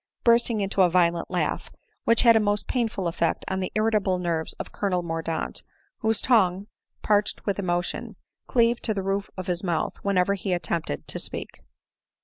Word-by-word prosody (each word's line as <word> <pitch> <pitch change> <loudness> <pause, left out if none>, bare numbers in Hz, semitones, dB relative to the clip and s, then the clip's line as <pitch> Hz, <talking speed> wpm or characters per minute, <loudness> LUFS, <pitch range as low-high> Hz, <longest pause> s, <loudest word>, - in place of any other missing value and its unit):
" - - -59
bursting 235 -2 +3
into 195 0 +1
a 180 - +6
violent 170 -1 +2
laugh, 180 -1 -1 0.4
which 230 0 +4
had 230 -2 +7
a - - +6
most 205 -1 +1
painful 225 -7 -1
effect 170 0 -1
on 190 - -1
the 185 - -3
irritable 215 -4 +2
nerves 170 -3 -2
of - - -7
Colonel 185 -3 -1
Mordaunt, 165 -1 -3 0.4
whose 220 -2 +2
tongue, 195 -6 +3 0.4
parched 205 0 +1
with 200 -1 -1
emotion, 175 -2 -2 0.3
cleaved 235 -1 +2
to 220 - +2
the 195 - -2
roof 195 +1 -1
of 185 - -4
his 180 -1 -2
mouth 170 -4 -1
whenever 200 -1 +2
he 195 -1 -2
attempted 170 - -3
to - - -4
speak. - - -6
195 Hz, 175 wpm, -25 LUFS, 175-215 Hz, 0.4 s, had